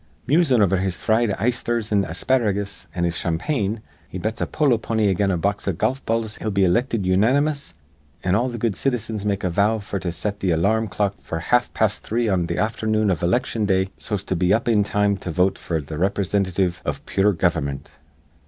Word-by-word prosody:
Musin' 140 Hz, -7 st, +4 dB
over 95 Hz, -1 st, +2 dB
his 95 Hz, -1 st, -1 dB
fried 115 Hz, 0 st, +2 dB
eyesthers 120 Hz, 0 st, -1 dB
an' 100 Hz, -2 st, +3 dB
asparagus 100 Hz, +2 st, -1 dB
an' 85 Hz, -, -1 dB
his 85 Hz, -1 st, 0 dB
champagne, 105 Hz, -, -1 dB, 0.3 s
he -, -, -6 dB
bets 110 Hz, +5 st, -3 dB
a -, -, 0 dB
polo 140 Hz, -7 st, +2 dB
pony 110 Hz, -2 st, +1 dB
again 95 Hz, +1 st, +1 dB
a 90 Hz, -, +1 dB
box 100 Hz, +5 st, -1 dB
of 95 Hz, -4 st, -1 dB
golf 130 Hz, +7 st, 0 dB
balls 115 Hz, -1 st, -1 dB
he'll 110 Hz, -, -3 dB
be 100 Hz, -1 st, +2 dB
ilicted 100 Hz, +3 st, +1 dB
unanimous; 130 Hz, -, +1 dB, 0.5 s
an' 90 Hz, -, +1 dB
all 120 Hz, +6 st, +2 dB
th' 120 Hz, -, -5 dB
good 115 Hz, -3 st, 0 dB
citizens 110 Hz, -3 st, -2 dB
make 100 Hz, -1 st, -1 dB
a 90 Hz, -, +1 dB
vow 105 Hz, +5 st, +2 dB
f'r 100 Hz, -2 st, -5 dB
to 90 Hz, -, -2 dB
set 100 Hz, +5 st, -4 dB
th' -, -, -4 dB
alar 100 Hz, +7 st, +2 dB
rm 110 Hz, -, -2 dB
clock 100 Hz, 0 st, -1 dB
f'r 80 Hz, -, -4 dB
half 120 Hz, +8 st, +2 dB
past 110 Hz, -1 st, +1 dB
three 115 Hz, +1 st, -1 dB
on 90 Hz, -4 st, +1 dB
th' -, -, -3 dB
afthernoon 110 Hz, -1 st, +1 dB
iv 85 Hz, -, -1 dB
iliction 105 Hz, +3 st, 0 dB
day, 95 Hz, -1 st, +2 dB
so's 105 Hz, -3 st, -4 dB
to 95 Hz, -, -2 dB
be 90 Hz, +2 st, +1 dB
up 110 Hz, +3 st, +2 dB
in 110 Hz, -3 st, +4 dB
time 105 Hz, 0 st, +1 dB
to 90 Hz, -, -7 dB
vote 90 Hz, +3 st, +1 dB
f'r 80 Hz, -2 st, -2 dB
th' 70 Hz, -, -13 dB
riprisintitive 95 Hz, +1 st, 0 dB
iv -, -, -4 dB
pure 100 Hz, +1 st, +2 dB
gover'mint. 70 Hz, -6 st, -1 dB
100 Hz, 210 wpm, -22 LUFS, 95-115 Hz, 0.5 s, Musin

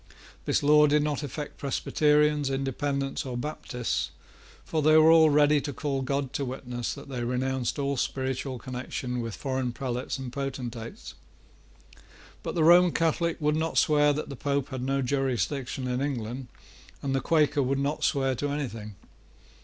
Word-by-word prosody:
This -, -, +1 dB
law 150 Hz, +1 st, +6 dB
did 150 Hz, 0 st, +3 dB
not 150 Hz, -1 st, -1 dB
affect 145 Hz, +1 st, -6 dB
Presbyterians, 150 Hz, +1 st, +2 dB
Independents, 135 Hz, +1 st, -2 dB
or 125 Hz, -2 st, -4 dB
Baptists; 125 Hz, -3 st, -3 dB, 0.6 s
for 160 Hz, -, -1 dB
they 155 Hz, +1 st, +6 dB
were 155 Hz, +1 st, +7 dB
all 160 Hz, -1 st, +7 dB
ready 150 Hz, 0 st, +4 dB
to 145 Hz, -, -4 dB
call 140 Hz, -1 st, -2 dB
God 140 Hz, 0 st, -2 dB
to 140 Hz, -, -1 dB
witness 125 Hz, -2 st, -4 dB
that 140 Hz, -, -10 dB
they 125 Hz, -3 st, -4 dB
renounced 125 Hz, +1 st, -1 dB
all 140 Hz, -1 st, 0 dB
spiritual 130 Hz, 0 st, -2 dB
connection 125 Hz, 0 st, -4 dB
with 115 Hz, -3 st, -5 dB
foreign 130 Hz, -2 st, -2 dB
prelates 125 Hz, +2 st, -3 dB
and 130 Hz, -2 st, -7 dB
potentates. 125 Hz, -4 st, -5 dB, 1.3 s
But -, -, -5 dB
the 165 Hz, -, +2 dB
Roman 175 Hz, +1 st, +6 dB
Catholic 165 Hz, +1 st, 0 dB
would 150 Hz, -1 st, +1 dB
not 160 Hz, +1 st, -1 dB
swear 150 Hz, -1 st, +4 dB
that 150 Hz, +1 st, -3 dB
the 140 Hz, -, -6 dB
Pope 140 Hz, +1 st, -1 dB
had 130 Hz, -2 st, -5 dB
no 135 Hz, +1 st, 0 dB
jurisdiction 135 Hz, 0 st, -1 dB
in 125 Hz, +1 st, -1 dB
England, 125 Hz, -2 st, -3 dB, 0.6 s
and 135 Hz, -1 st, -1 dB
the 135 Hz, -, +1 dB
Quaker 150 Hz, -3 st, +2 dB
would 135 Hz, +1 st, 0 dB
not 140 Hz, +2 st, -1 dB
swear 135 Hz, -2 st, +2 dB
to 145 Hz, +4 st, -2 dB
anything. 115 Hz, -8 st, -4 dB
140 Hz, 160 wpm, -27 LUFS, 130-150 Hz, 1.3 s, were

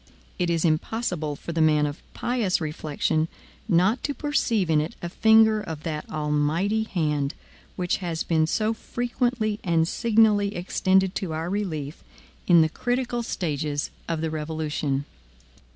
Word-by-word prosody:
It 175 Hz, -1 st, +1 dB
is 170 Hz, 0 st, +1 dB
impossible 160 Hz, -2 st, -1 dB
for 170 Hz, -, -7 dB
the 165 Hz, -1 st, 0 dB
man 150 Hz, -1 st, +4 dB
of 145 Hz, +1 st, -5 dB
pious 235 Hz, -7 st, 0 dB
reflection 155 Hz, 0 st, -1 dB, 0.4 s
not 185 Hz, +6 st, +3 dB
to 285 Hz, -, -2 dB
perceive 235 Hz, -, +1 dB
in 155 Hz, -2 st, +3 dB
it 155 Hz, -, -5 dB
a 175 Hz, -, -5 dB
finger 220 Hz, +2 st, +5 dB
of 160 Hz, -6 st, -7 dB
that 155 Hz, -2 st, -4 dB
Almighty 155 Hz, +8 st, 0 dB
hand 150 Hz, -7 st, -1 dB, 0.4 s
which 180 Hz, -1 st, 0 dB
has 170 Hz, -4 st, -3 dB
been 160 Hz, -2 st, +2 dB
so 215 Hz, +6 st, +1 dB
frequently 240 Hz, -2 st, -1 dB
and 165 Hz, -3 st, +2 dB
signally 215 Hz, -2 st, +3 dB
extended 190 Hz, +1 st, +2 dB
to 175 Hz, -5 st, -3 dB
our 165 Hz, +3 st, -3 dB
relief 160 Hz, -8 st, -3 dB, 0.4 s
in 170 Hz, -2 st, +7 dB
the 160 Hz, -, +1 dB
critical 245 Hz, +4 st, -1 dB
stages 150 Hz, -9 st, -2 dB, 0.2 s
of 165 Hz, -2 st, -1 dB
the 160 Hz, -1 st, -1 dB
revolution. 150 Hz, -3 st, -2 dB
170 Hz, 145 wpm, -25 LUFS, 155-215 Hz, 0.4 s, in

